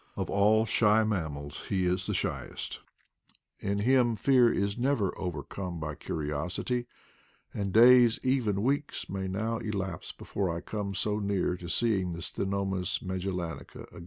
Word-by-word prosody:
Of - - -2
all 105 +3 +4
shy 110 -1 +4
mammals 80 -8 -3
he 95 -2 +1
is 90 +1 0
the - - -1
shyest; - - -3 0.8
in 100 0 -1
him 120 +2 +3
fear 125 +2 +4
is 100 0 0
never 120 -6 0
overcome 90 -1 -5
by 75 -1 -4
curi 75 0 -4
osity, 90 - -2 0.7
and 100 -1 -2
days, 120 +1 +7
even 115 -7 +1
weeks, 140 +3 -1
may 95 -1 -3
now 110 +4 -2
elapse 95 -5 -4
be - - -13
fore 100 -2 -1
I 85 0 -3
come 100 -1 -4
so 105 +3 0
near 100 -3 0
seeing 95 -2 +1
the 85 - -6
Ctenomys 95 -1 -1
magel 95 0 -3
lanica 85 -5 -6
again. - - -11
100 Hz, 155 wpm, -29 LUFS, 90-110 Hz, 0.8 s, days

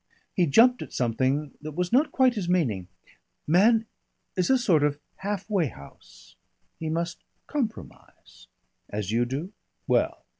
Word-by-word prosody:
He 175 -2 +2
jumped 245 - +5
at - - -7
something 130 +4 0
that 155 0 -6
was 180 +5 -2
not 285 +5 +4
quite 260 -2 +4
his 195 -6 -3
meaning. 120 - +1 0.6
"Man 220 +8 +4 0.5
is 185 -3 +1
a 265 - +5
sort 190 - +3
of 145 0 +1 0.2
half 200 0 -4
way 195 -7 +1
house 70 - -15 0.4
he 160 - -3
must 170 +2 -3 0.2
compromise." 245 -7 -6 0.4
"As 105 -1 -3
you 120 +2 +2
do?" 145 - -5 0.3
"Well. - - +1
170 Hz, 145 wpm, -26 LUFS, 140-215 Hz, 0.6 s, jumped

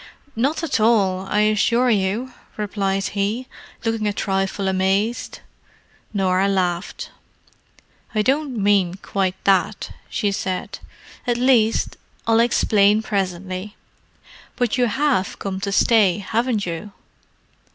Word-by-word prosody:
"Not 275 +8 0
at 285 -7 0
all, 195 -4 +2
I 210 - +2
assure 230 +4 +3
you," 215 +5 0 0.2
replied 195 -2 -1
he, 210 +5 -2 0.4
looking 225 -2 0
a 205 - 0
trifle 195 0 -1
amazed. 195 +5 0 0.7
Norah 190 -2 +1
laughed. 180 -2 -2 1.0
"I 215 - +2
don't 275 0 0
mean 195 -3 +2
quite 190 -1 -2
that," 195 -2 +1 0.2
she 205 -3 0
said—"at 195 +5 -5
least 240 -3 +2 0.3
I'll 225 0 +3
explain 215 -2 +3
presently. 190 0 -3 0.8
But 245 -3 0
you 245 -1 +2
have 265 -4 0
come 190 -1 -4
to 200 +1 -3
stay, 205 -3 +4
haven't 220 +2 -1
you?" 175 +4 -6
205 Hz, 110 wpm, -21 LUFS, 195-230 Hz, 1.0 s, stay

